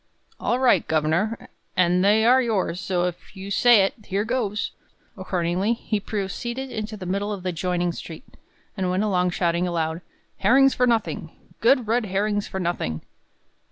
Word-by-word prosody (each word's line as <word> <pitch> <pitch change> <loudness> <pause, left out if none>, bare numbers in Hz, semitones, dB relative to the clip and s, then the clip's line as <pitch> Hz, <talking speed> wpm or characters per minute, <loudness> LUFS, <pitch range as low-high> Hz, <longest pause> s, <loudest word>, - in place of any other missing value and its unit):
"All 240 - 0
right, 255 -1 +3
governor, 160 +8 0 0.3
an' 180 0 +3
they 210 +3 +4
are 255 +2 +6
yours; 205 -7 -1
so 185 -2 -1
if 180 +2 -5
you 195 +1 -7
say 220 +1 +6
it, 195 - 0
here 200 +2 -1
goes!" 215 -4 -1 0.4
Accordingly, 185 +2 -1
he 220 -2 -2
proceeded 235 +6 -4
into 215 -1 -5
the 190 - -7
middle 200 +3 -2
of 200 -3 -5
the 185 - -1
adjoining 175 0 -1
street, 165 - -9 0.5
and 190 -3 -1
went 185 +3 +1
along, 180 -4 +1
shouting 175 0 0
aloud: 165 -1 -2 0.4
"Herrings 265 +7 +5
for 250 - +2
nothing! 230 -2 0 0.3
Good 250 +1 +4
red 230 +1 +1
herrings 205 +2 -1
for 190 - -5
nothing!" 170 - -2
195 Hz, 160 wpm, -24 LUFS, 180-220 Hz, 0.5 s, are